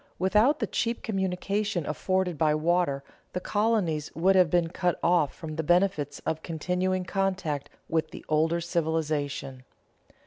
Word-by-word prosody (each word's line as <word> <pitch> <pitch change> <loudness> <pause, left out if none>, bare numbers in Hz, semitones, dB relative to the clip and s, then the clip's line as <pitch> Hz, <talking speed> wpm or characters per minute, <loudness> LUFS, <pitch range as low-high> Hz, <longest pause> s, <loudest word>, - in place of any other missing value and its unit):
Without 210 - +3
the - - -1
cheap 230 0 -2
communication 195 -2 -1
afforded 185 +2 0
by 150 0 +2
water, 155 -3 +1 0.3
the 180 - -1
colonies 200 -7 0
would 190 +4 +3
have 180 -3 +5
been 170 0 +2
cut 175 0 0
off 170 -4 +3
from 155 -1 -7
the - - +1
benefits 165 -4 +2
of 160 0 -1
continuing 180 +3 -1
contact 190 -7 -1 0.2
with 160 -1 0
the - - -10
older 160 +2 +2
civilization. 155 -5 -2
175 Hz, 140 wpm, -27 LUFS, 155-190 Hz, 0.3 s, have